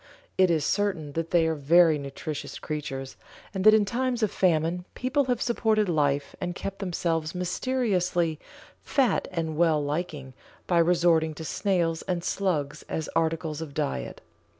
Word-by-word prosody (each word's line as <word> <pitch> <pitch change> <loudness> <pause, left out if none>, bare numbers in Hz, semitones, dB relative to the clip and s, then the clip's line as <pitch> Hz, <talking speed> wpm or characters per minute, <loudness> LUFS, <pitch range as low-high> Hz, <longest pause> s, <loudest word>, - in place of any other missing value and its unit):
It 185 -1 +4
is 160 -4 +1
certain 190 -7 0
that 165 +2 -3
they 170 -2 +3
are 160 - +1
very 160 +1 +4
nutritious 140 +2 -6
creatures, 135 -3 -5 0.4
and 190 -1 -2
that 215 0 +9
in 210 -1 +3
times 245 +1 -1
of 215 - +1
famine 170 0 +1
people 265 +2 0
have 250 -2 0
supported 220 -3 +1
life 145 -4 0
and 175 0 -3
kept 195 +1 -5
themselves 170 -3 -2
mysteriously 180 - 0 0.4
"fat 270 -4 +1
and 165 -3 -2
well 160 -1 +3
liking" 145 -3 -4 0.3
by 175 -2 +2
resorting 165 -2 +3
to 160 - -7
snails 170 -3 0
and 175 -2 -1
slugs 165 -8 -1
as 160 - -3
articles 160 -1 -1
of 150 -3 -7
diet. 65 -2 -3
170 Hz, 150 wpm, -27 LUFS, 155-190 Hz, 0.4 s, that